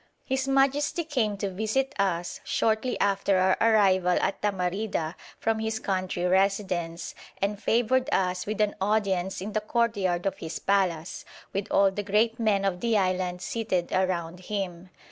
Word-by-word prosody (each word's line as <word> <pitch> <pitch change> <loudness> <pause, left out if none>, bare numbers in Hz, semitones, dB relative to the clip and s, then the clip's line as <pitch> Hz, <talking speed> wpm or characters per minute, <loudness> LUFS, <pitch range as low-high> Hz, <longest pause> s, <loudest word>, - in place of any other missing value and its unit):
His 265 0 -1
Majesty 275 +4 +2
came 245 -10 -1
to 200 -1 -3
visit 220 +8 -1
us, 175 -3 -1
shortly 225 +3 0
after 200 -1 +2
our 185 0 +4
arrival 190 -5 +4
at 195 - -1
Tamarida, 190 -3 -1 0.2
from 225 0 0
his 220 0 -1
country 185 -3 -2
residence, 185 -3 0 0.3
and 200 +1 -1
favoured 250 +4 +2
us 180 0 0
with 215 0 -1
an 210 -1 +2
audience 195 -3 0
in 205 +2 -5
the 215 - 0
courtyard 205 -6 0
of 195 - -1
his 160 -1 -5
palace, 185 -4 0 0.3
with 195 0 -2
all 195 -1 +4
the 205 - -3
great 215 +3 +1
men 205 -3 +2
of 185 -2 0
the 230 0 +1
island 185 -2 0
seated 190 -7 -2
around 180 -2 -1
him. 185 -3 -4
195 Hz, 155 wpm, -27 LUFS, 185-220 Hz, 0.3 s, our